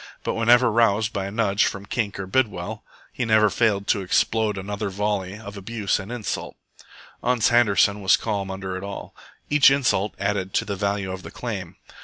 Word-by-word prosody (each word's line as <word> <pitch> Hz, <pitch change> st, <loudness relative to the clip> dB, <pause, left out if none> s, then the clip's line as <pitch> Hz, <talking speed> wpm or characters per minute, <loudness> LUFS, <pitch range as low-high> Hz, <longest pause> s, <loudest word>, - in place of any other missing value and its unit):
But -, -, -1 dB
whenever 120 Hz, +1 st, +4 dB
roused 110 Hz, -1 st, +2 dB
by 95 Hz, -1 st, -2 dB
a -, -, -6 dB
nudge 105 Hz, -2 st, +2 dB
from 100 Hz, 0 st, -4 dB
Kink 105 Hz, -2 st, -2 dB
or 95 Hz, -, -3 dB
Bidwell, 105 Hz, -1 st, -1 dB, 0.3 s
he 125 Hz, -, -2 dB
never 110 Hz, -2 st, +4 dB
failed 105 Hz, -3 st, +1 dB
to 100 Hz, -, +2 dB
explode 105 Hz, +3 st, +1 dB
another 100 Hz, +2 st, -4 dB
volley 100 Hz, -1 st, -2 dB
of 100 Hz, -2 st, -9 dB
abuse 100 Hz, +1 st, -1 dB
and 95 Hz, +3 st, -8 dB
insult. 120 Hz, -4 st, -4 dB, 0.7 s
Ans 120 Hz, -2 st, +2 dB
Handerson 105 Hz, -3 st, +3 dB
was 95 Hz, -3 st, +4 dB
calm 100 Hz, -3 st, -3 dB
under 95 Hz, -1 st, -5 dB
it 95 Hz, -, -6 dB
all. 100 Hz, 0 st, -7 dB, 0.4 s
Each 150 Hz, -2 st, +7 dB
insult 125 Hz, -7 st, +1 dB
added 100 Hz, -1 st, -2 dB
to -, -, +1 dB
the 100 Hz, -, -3 dB
value 100 Hz, -1 st, -2 dB
of 95 Hz, 0 st, -6 dB
the -, -, -9 dB
claim. 95 Hz, -7 st, -6 dB
105 Hz, 185 wpm, -23 LUFS, 95-115 Hz, 0.7 s, Each